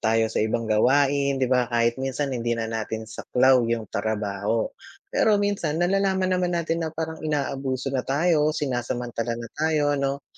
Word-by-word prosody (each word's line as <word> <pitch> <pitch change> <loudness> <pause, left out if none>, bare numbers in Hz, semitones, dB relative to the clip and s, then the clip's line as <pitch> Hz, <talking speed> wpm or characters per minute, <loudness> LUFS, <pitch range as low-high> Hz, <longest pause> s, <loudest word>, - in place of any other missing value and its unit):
tayo 115 0 +2
sa - - 0
ibang 115 +2 0
gawain 140 +5 +3
'di 135 - +1
ba? 125 -2 +2
Kahit 120 +1 +1
minsan 135 +1 -2
hindi 120 -1 -1
na 115 - -2
natin 110 0 -4
saklaw 125 +4 +3
'yung 115 -2 -1
trabaho. 105 +1 -1 0.5
Pero 215 -1 +4
minsan 200 -7 -1
nalalaman 190 +1 +1
naman 180 -1 +1
natin 165 0 -1
na 160 - -1
parang 160 0 -5
inaabuso 135 -3 -2
na 135 - +1
tayo, 150 +3 +1
sinasamantala 120 -3 -2
na 115 0 -7
tayo 150 -2 +1
'no. 140 0 -2
135 Hz, 160 wpm, -25 LUFS, 115-155 Hz, 0.5 s, Pero